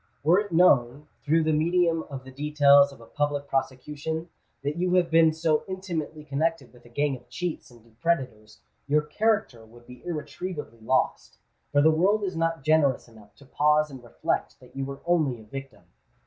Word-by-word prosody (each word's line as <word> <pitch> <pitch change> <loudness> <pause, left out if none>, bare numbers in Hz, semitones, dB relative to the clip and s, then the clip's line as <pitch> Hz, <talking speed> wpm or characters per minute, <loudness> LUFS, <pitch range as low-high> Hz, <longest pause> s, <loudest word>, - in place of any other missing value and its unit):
Were 170 +6 +5
it 205 -2 -4
known, 145 -5 +3 0.2
through 160 +2 +2
the 155 0 +1
medium 165 +1 +2
of 135 -2 -7
the 130 - -12
details 140 0 +4
of 135 - -15
a - - -13
public 145 +2 -2
prosecution, 150 +5 -3 0.3
that 145 +1 -2
you 180 +1 0
have 175 -2 +2
been 165 -1 +5
so 160 -1 0
intimately 170 -5 -5
connected 150 -1 -2
with 120 - -19
a - - -15
gang 145 +3 0
of 125 -1 -15
cheats 175 -3 -4
and 120 -2 -18
depredators, 115 -5 -3 0.3
your 150 +1 +2
character 205 - 0
would 120 +2 -18
be 125 0 -14
irretrievably 155 -6 -6
lost; 130 +4 -1 0.3
for 145 0 +4
the 160 - +6
world 195 +7 +2
is 190 -3 -3
not 165 -3 -1
generous 150 -5 +2
enough 110 -3 -18
to 140 - -18
pause 150 +2 +2
and 130 -2 -10
reflect 120 - -3
that - - -18
you 135 0 -3
were 135 0 -8
only 155 -8 +1
a - - -13
victim. 135 +4 -9
150 Hz, 185 wpm, -26 LUFS, 130-165 Hz, 0.3 s, the